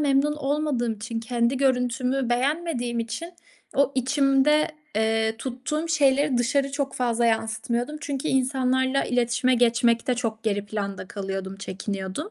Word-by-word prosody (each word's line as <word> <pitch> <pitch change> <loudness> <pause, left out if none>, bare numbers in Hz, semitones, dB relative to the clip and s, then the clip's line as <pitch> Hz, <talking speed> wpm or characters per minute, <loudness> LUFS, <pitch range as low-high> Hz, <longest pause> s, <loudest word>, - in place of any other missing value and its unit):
memnun 290 +1 +2
olmadığım 280 -5 0
için, 225 +2 -5
kendi 240 +2 0
görüntümü 255 -1 +1
beğenmediğim 250 -2 0
için 280 +10 -5 0.4
o 280 0 +3
içimde, 275 +3 +3 0.3
eee, 220 0 +1
tuttuğum 270 +7 -3
şeyleri 285 -3 +3
dışarı 275 +3 +1
çok 280 -1 -2
fazla 240 -1 +1
yansıtmıyordum 235 +5 -1
çünkü 285 0 -3
insanlarla 260 0 +1
iletişime 245 +1 +2
geçmekte 235 0 +3
çok 225 -2 -3
geri 205 -2 -1
planda 200 -2 -4
kalıyordum, 195 -1 -5
çekiniyordum. 200 - -5
250 Hz, 120 wpm, -25 LUFS, 225-275 Hz, 0.4 s, o